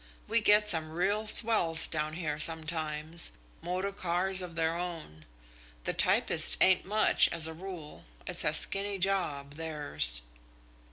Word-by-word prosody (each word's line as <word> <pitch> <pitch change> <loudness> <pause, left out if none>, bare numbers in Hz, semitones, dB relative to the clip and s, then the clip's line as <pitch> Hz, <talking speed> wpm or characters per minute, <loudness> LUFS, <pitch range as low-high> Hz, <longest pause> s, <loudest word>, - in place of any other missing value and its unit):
We 230 +1 -1
get 210 0 +3
some 160 -5 +4
real 200 +6 -3
swells 210 -8 +4
down 155 -1 -4
here 155 -3 -5
sometimes 155 0 +2 0.3
motor 180 +4 -4
cars 185 0 -1
of 175 -2 -9
their 165 0 -2
own. 165 - -9 0.6
The - - -3
typists - - +1
ain't 185 -1 +3
much, 215 +3 +2
as 165 -2 0
a 160 - -3
rule. 170 -3 -11 0.2
It's - - +2
a - - 0
skinny 200 0 +1
job, 155 -7 -3
theirs." 145 - -3
170 Hz, 135 wpm, -28 LUFS, 155-190 Hz, 0.6 s, some